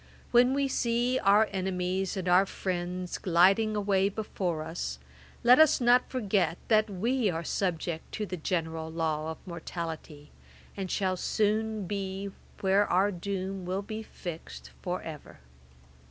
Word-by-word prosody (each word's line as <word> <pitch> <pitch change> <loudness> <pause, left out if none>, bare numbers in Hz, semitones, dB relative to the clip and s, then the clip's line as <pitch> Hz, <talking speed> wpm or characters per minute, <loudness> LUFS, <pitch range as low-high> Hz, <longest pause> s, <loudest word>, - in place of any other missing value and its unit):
When 245 +2 +5
we 280 0 +1
see 245 0 +1
our 205 +2 +5
enemies 185 0 -1
and 185 +1 +3
friends 180 -1 -3
gliding 195 +5 +4
away 200 -1 +2
before 185 -6 -3
us, 165 +2 -4 0.5
let 245 +3 +7
us 315 -2 +6
not 245 0 +4
forget 200 -9 0
that 215 -1 +4
we 225 +4 0
are 165 -1 -2
subject 170 -3 -2
to 215 - -2
the 185 - -4
general 160 -1 -2
law 160 -1 -1
of 160 - -5
mortality, 165 -4 -6 0.4
and 190 -2 -4
shall 185 -1 0
soon 215 +1 0
be 195 0 -4 0.3
where 195 +1 +3
our 190 +3 +3
doom 190 +1 -4
will 185 +3 -2
be 215 +1 -5
fixed 160 - -8
for - - -3
ever. - - -9
190 Hz, 140 wpm, -29 LUFS, 175-215 Hz, 0.5 s, let